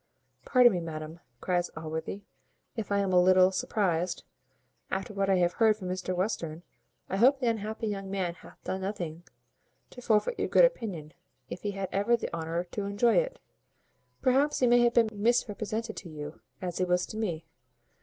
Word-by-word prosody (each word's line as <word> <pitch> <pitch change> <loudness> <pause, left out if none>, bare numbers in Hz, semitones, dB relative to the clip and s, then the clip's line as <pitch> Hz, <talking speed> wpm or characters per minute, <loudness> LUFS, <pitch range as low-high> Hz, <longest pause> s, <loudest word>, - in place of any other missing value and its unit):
"Pardon 250 -2 +6
me, 180 - -1
madam," 160 0 -6 0.2
cries 175 -1 0
Allworthy, 160 +5 -5 0.5
"if 225 -3 -5
I 200 - +3
am 190 -2 0
a 180 - +6
little 185 +1 +5
surprized, 185 -3 -1 0.7
after 195 +2 -3
what 195 -1 0
I 195 - +5
have 175 -1 +2
heard 220 -2 +3
from 185 -4 -6
Mr 185 0 -3
Western 175 -4 -2 0.4
I 190 - -2
hope 265 +6 +5
the 255 - -2
unhappy 220 0 -2
young 195 -2 -3
man 190 -3 -2
hath 170 - -17
done 190 - -3
nothing 175 -4 -5 0.7
to 250 - -11
forfeit 235 - +1
your - - 0
good - - +7
opinion, 180 - -3 0.4
if 180 - -6
he 205 -1 -3
had 195 -1 -3
ever 205 +5 +2
the - - -5
honour 165 +1 -2
to 205 - -3
enjoy 205 +4 +2
it. - - +1 0.9
Perhaps, 275 +3 +3
he 255 - +3
may 245 0 +5
have 240 0 +3
been 230 -2 +5
misrepresented 220 0 -1
to 175 - -8
you, 150 0 -8 0.2
as 180 -1 -3
he - - +2
was 180 0 +1
to 215 - -8
me. 175 -8 -3
195 Hz, 185 wpm, -29 LUFS, 175-225 Hz, 0.9 s, good